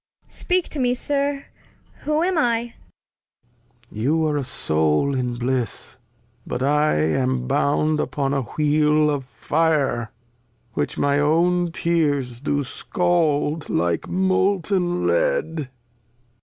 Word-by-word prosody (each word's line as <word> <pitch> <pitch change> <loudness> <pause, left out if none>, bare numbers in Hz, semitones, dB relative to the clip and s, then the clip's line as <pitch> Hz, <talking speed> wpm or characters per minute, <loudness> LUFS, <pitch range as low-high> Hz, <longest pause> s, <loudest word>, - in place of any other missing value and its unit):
• - - -71
Cord. - - -28
Speak 365 -1 0
to 300 - -5
me. 250 -1 +2
Sir, 280 +1 0 0.6
whom 305 +2 +1
am 370 +1 +1
I? 235 -5 +2
Lear. 240 -1 -11 1.2
You 150 +9 0
are 150 -1 0
a 140 - -1
Soul 80 - +1
in 125 -2 -2
Bliss, 125 0 -2 0.5
but 125 - -3
I 150 - +2
am 125 - 0
bound 145 +3 +1
Upon 140 -2 -1
a 140 - +1
Wheel 150 +3 +2
of 140 -3 -3
Fire, 145 -5 0 0.6
which - - -2
my 140 0 +2
own 170 +3 +2
Tears 145 -8 0
Do 145 +1 -1
scald 160 0 0
hke 85 -1 -1
Molten 185 -1 +1
Lead. - - +1
Cord. 145 -4 -4
150 Hz, 130 wpm, -22 LUFS, 130-180 Hz, 1.2 s, me